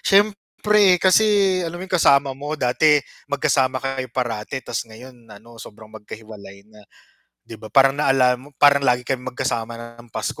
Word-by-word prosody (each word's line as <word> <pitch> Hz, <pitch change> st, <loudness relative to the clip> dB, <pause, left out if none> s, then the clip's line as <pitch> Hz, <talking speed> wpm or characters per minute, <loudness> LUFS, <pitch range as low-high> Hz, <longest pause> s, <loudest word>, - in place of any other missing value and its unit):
siyempre 205 Hz, -1 st, +2 dB
kasi 195 Hz, 0 st, +2 dB
alam 175 Hz, -, -8 dB
mo 185 Hz, -, -7 dB
'yong 190 Hz, -1 st, -1 dB
kasama 140 Hz, -2 st, +3 dB
mo 145 Hz, +3 st, -6 dB
dati, 150 Hz, +4 st, +2 dB, 0.3 s
mag-kasama 140 Hz, -2 st, 0 dB
kayo 135 Hz, -1 st, -4 dB
parati 120 Hz, 0 st, -4 dB
ta's 115 Hz, -, -4 dB
ngayon 120 Hz, +1 st, -15 dB
ano 110 Hz, +2 st, -15 dB
sobrang 110 Hz, +1 st, -14 dB
magka-hiwalay 105 Hz, -2 st, -12 dB
na, 105 Hz, -, -17 dB, 0.6 s
'di 115 Hz, -1 st, -12 dB
ba 110 Hz, -, -10 dB
parang 135 Hz, +4 st, +3 dB
naalala 130 Hz, -3 st, +2 dB
mo, 140 Hz, -, -15 dB
"Parang 140 Hz, -1 st, +5 dB
lagi 125 Hz, -2 st, 0 dB
kaming 125 Hz, -1 st, -5 dB
magkasama 115 Hz, -1 st, -3 dB
na 115 Hz, 0 st, -12 dB
ng 120 Hz, -, -17 dB
Pasko -, -, -5 dB
130 Hz, 165 wpm, -20 LUFS, 115-150 Hz, 0.6 s, Parang